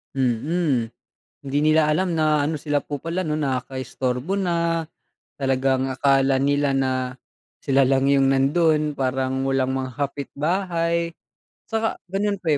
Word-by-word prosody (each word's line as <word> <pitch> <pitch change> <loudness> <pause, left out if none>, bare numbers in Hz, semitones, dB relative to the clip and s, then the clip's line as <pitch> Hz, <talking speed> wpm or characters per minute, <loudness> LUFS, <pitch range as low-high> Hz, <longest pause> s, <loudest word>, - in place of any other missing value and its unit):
Mm. 130 0 0 0.5
Hindi 140 +1 0
nila 155 +1 +4
alam 165 +3 +1
na 155 -1 +3
ano, 155 +2 -1
sila 145 0 -1
po 145 - -5
pala 165 +6 -3
'no, 155 -4 -1
nakakaistorbo 130 +1 -2
na. 170 -4 0 0.5
Talagang 135 -1 +1
akala 135 0 +3
nila 145 +1 +1
na 135 -1 +1 0.7
sila 135 -1 +2
lang 135 +1 +2
yung 135 -1 +4
nando'n, 150 +3 +2
parang 130 -1 -1
walang 130 -1 +1
mga 130 -1 -3
kapitbahay. 170 +4 -1 0.6
Tsaka 225 0 -1
gano'n 200 +1 -1
pa, 175 - -9
145 Hz, 130 wpm, -23 LUFS, 135-165 Hz, 0.7 s, nila